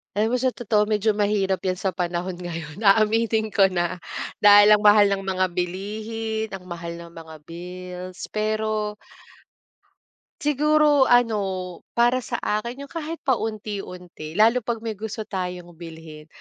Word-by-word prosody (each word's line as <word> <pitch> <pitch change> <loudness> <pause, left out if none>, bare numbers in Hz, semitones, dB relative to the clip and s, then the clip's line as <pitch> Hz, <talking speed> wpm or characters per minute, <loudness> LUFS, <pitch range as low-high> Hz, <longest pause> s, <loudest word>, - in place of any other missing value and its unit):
Alam 215 +2 +1
mo 250 - +1
sa 255 0 0
totoo 210 -3 +1
medyo 215 0 +1
mahirap 205 -2 +1
'yan 185 - +1
sa 190 +1 -2
panahon 175 0 -3
ngayon, 165 -2 -7
aaminin 220 +2 +3
ko 195 -1 +5
na. 180 -1 -2 0.4
Dahil 205 0 +8
ang 210 - +7
mahal 205 -1 +6
ng 195 -1 -2
mga 185 -1 +1
bilihin, 215 +5 -3
ang 180 -1 -9
mahal 170 0 -6
ng 170 0 -10
mga 160 -1 -11
bills, 180 +2 -8
pero 215 0 -1 1.5
siguro 295 -1 +4
ano, 245 -3 +4 0.6
para 240 +2 +3
sa 255 - -5
akin 235 +6 -2
'yong 280 - -11
kahit 325 +1 -6
paunti-unti, 200 - -4
lalo 225 +5 +5
'pag 230 -2 -2
may 220 -3 -5
gusto 220 +1 -5
tayong 180 -3 -5
bilhin, 160 -2 -10
205 Hz, 145 wpm, -23 LUFS, 180-220 Hz, 1.5 s, Dahil